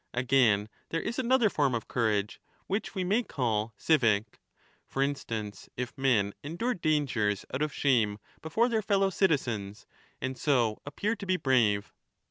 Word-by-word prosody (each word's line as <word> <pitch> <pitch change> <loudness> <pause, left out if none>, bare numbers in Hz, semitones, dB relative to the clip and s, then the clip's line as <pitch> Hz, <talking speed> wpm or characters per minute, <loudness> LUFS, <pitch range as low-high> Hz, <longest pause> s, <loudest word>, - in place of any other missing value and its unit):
Again, 120 -5 +3 0.2
there 165 - -1
is 235 - -3
another 255 -2 +3
form 140 -9 +1
of 115 - -4
courage, 105 -3 0 0.2
which 205 +3 -3
we 190 - -1
may 200 +6 +2
5 - - -14
call 110 -4 -1
civic; 115 -9 +2 0.5
for 135 - 0
instance, 110 -8 -4
if 125 -1 -4
men 120 -8 +2
endure 175 +12 -2
dangers 135 - 0
out 130 - -2
of 150 -1 0
shame 115 -9 +2 0.2
before 220 +10 +1
their 225 -3 +1
fellow 195 -2 +2
citizens, 120 - 0 0.3
and 130 0 -3
so 120 -7 +1
appear 205 +10 -1
to 200 - -7
be 185 0 +2
brave. 110 - +2
135 Hz, 155 wpm, -29 LUFS, 110-180 Hz, 0.5 s, Again